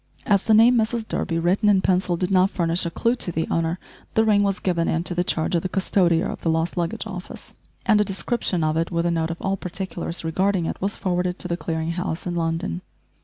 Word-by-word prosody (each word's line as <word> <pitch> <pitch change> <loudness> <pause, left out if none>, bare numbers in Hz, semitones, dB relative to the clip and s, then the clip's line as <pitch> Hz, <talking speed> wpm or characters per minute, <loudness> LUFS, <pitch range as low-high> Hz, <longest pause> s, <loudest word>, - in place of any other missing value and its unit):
As 200 -2 +2
the 220 - +5
name 235 +3 +6
"Mrs 225 0 -1
Durby" 165 - -2
written 185 +6 +2
in 195 -2 +4
pencil 180 -2 +1
did 180 +2 -2
not 185 0 +4
furnish 170 -1 0
a - - -1
clue 230 +7 +1
to 175 - -1
the 160 0 -2
owner, 165 +1 0 0.4
the 220 - +4
ring 210 -2 +4
was 200 -1 +1
given 170 -3 0
into 170 +2 -1
the 175 +1 +1
charge 160 -1 -1
of 170 - +2
the 185 - -3
custodier 180 -2 +2
of - - -6
the 165 - 0
lost 160 +1 0
luggage 175 +6 -2
office, 185 -4 -8 0.3
and 215 -2 +4
a - - +4
description 190 -2 -1
of 155 0 +1
it 165 +1 0
with 170 -1 -1
a 170 - +2
note 165 -1 0
of 165 - -5
all 195 0 -1
particulars 180 -2 -4
regarding 185 +2 +1
it, - - -4
was 200 +2 -1
forwarded 180 -1 -1
to - - -4
the 170 - -1
Clearing 160 -1 -3
House 175 -1 -3
in 175 - -2
London. 165 - -2
180 Hz, 235 wpm, -23 LUFS, 165-195 Hz, 0.4 s, name